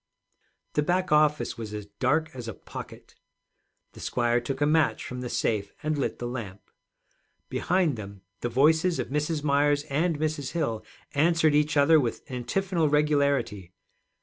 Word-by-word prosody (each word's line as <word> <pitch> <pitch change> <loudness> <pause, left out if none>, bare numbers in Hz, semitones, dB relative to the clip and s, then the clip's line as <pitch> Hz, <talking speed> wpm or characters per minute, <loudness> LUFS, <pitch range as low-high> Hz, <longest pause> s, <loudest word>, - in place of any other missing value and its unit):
The 150 - +2
back 180 +4 0
office 150 -5 +2
was 105 -2 -5
as 105 -1 -6
dark 155 +10 0
as 125 -3 -7
a 115 - -5
pocket. - - -10 0.8
The - - -14
squire 120 0 +1
took 135 +3 -4
a 145 - +3
match 155 +1 +2
from 125 0 -6
the 125 - -4
safe, 100 -4 -1
and 155 0 0
lit 140 - -2
the 120 - -5
lamp. 110 -6 -7 0.8
Behind 175 -7 +1
them 100 -2 -9 0.2
the 120 - -2
voices 160 +8 +3
of - - -3
Mrs. 150 +2 -1
Myers 145 0 +2
and 160 +3 +1
Mrs. 150 -2 -2
Hill 115 -10 -1 0.3
answered 160 +1 +3
each 150 +1 +2
other 155 +3 +6
with 120 -5 -2
antiphonal 160 +7 0
regularity. 140 - +1
145 Hz, 155 wpm, -27 LUFS, 120-155 Hz, 0.8 s, other